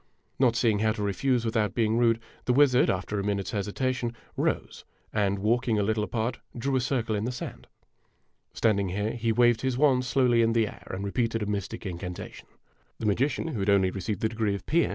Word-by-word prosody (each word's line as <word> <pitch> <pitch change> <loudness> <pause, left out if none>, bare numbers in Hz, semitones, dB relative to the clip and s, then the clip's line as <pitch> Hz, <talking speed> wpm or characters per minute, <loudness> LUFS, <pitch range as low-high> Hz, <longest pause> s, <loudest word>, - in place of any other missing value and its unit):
Not 125 -3 +4
seeing 110 -3 +2
how 110 0 +2
to 105 - -4
refuse 120 +5 0
without 110 -3 0
being 110 -2 +2
rude, 115 -1 +3 0.3
the 125 - +2
wizard, 135 -2 +5
after 100 +2 -1
a - - -2
minute's 100 -1 -1
hesitation, 120 +4 -2 0.2
rose - - -2 0.3
and, 100 -2 +1
walking 115 +3 +1
a 105 - +2
little 110 +1 0
apart, 115 +3 -2 0.2
drew 135 +3 -1
a 130 - +2
circle 120 -3 -1
in 105 +1 -1
the 125 - -1
sand. 125 - -7 0.8
Standing 100 -4 +1
here, 105 +4 -1
he 115 -1 -1
waved 120 0 +4
his 130 -2 -1
wand 130 -3 +4
slowly 125 -2 +3
in 115 0 +3
the 115 -1 +3
air - - -11
and 95 +2 -4
repeated 115 +2 -1
a - - -2
mystic 105 +2 -4
incantation. 90 -1 -6 0.5
The - - -5
magician, 130 +10 +1
who 120 - -4
had 100 +1 0
only 95 -2 +4
received 100 +1 -4
the 110 - +1
degree 110 -3 -1
of 100 - -8
P. 170 +2 +3
M. - - -3
110 Hz, 210 wpm, -27 LUFS, 100-120 Hz, 0.8 s, wizard